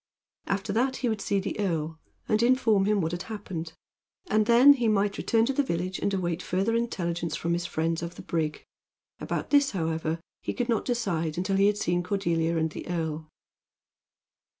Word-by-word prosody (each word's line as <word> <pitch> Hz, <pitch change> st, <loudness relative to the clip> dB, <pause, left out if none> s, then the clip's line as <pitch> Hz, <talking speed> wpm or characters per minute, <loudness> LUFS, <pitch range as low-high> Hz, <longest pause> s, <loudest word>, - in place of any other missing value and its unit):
After 200 Hz, +1 st, -1 dB
that 260 Hz, +4 st, +1 dB
he 250 Hz, -, -1 dB
would 220 Hz, -2 st, -2 dB
see 200 Hz, 0 st, +1 dB
the 195 Hz, +2 st, -4 dB
earl, 165 Hz, -5 st, -1 dB, 0.3 s
and 215 Hz, 0 st, +2 dB
inform 235 Hz, -5 st, +3 dB
him 210 Hz, -1 st, +2 dB
what 160 Hz, -1 st, -1 dB
had 175 Hz, 0 st, -3 dB
happened; 185 Hz, -7 st, -5 dB, 0.6 s
and 215 Hz, 0 st, +3 dB
then 250 Hz, +5 st, +8 dB
he 245 Hz, -4 st, 0 dB
might 205 Hz, -1 st, +1 dB
return 225 Hz, -1 st, +2 dB
to 275 Hz, -, 0 dB
the 285 Hz, -, +2 dB
village 180 Hz, -6 st, -2 dB
and 200 Hz, -, 0 dB
await 175 Hz, -3 st, -1 dB
further 195 Hz, +6 st, 0 dB
intelligence 175 Hz, -8 st, -2 dB
from 170 Hz, +1 st, -1 dB
his 175 Hz, +1 st, -1 dB
friends 165 Hz, +1 st, -1 dB
of 170 Hz, 0 st, -5 dB
the -, -, -10 dB
brig. 155 Hz, -2 st, -2 dB, 0.5 s
About -, -, -3 dB
this, 285 Hz, -1 st, +5 dB
however, 160 Hz, -2 st, -1 dB, 0.2 s
he -, -, -4 dB
could 245 Hz, -1 st, -2 dB
not 225 Hz, -3 st, +1 dB
decide 175 Hz, -11 st, -1 dB
until 190 Hz, +2 st, 0 dB
he 200 Hz, +1 st, +5 dB
had 210 Hz, 0 st, +2 dB
seen 175 Hz, -3 st, 0 dB
Cordelia 170 Hz, -3 st, 0 dB
and 160 Hz, 0 st, 0 dB
the -, -, -8 dB
earl. 160 Hz, -2 st, -3 dB
190 Hz, 190 wpm, -27 LUFS, 165-220 Hz, 0.6 s, then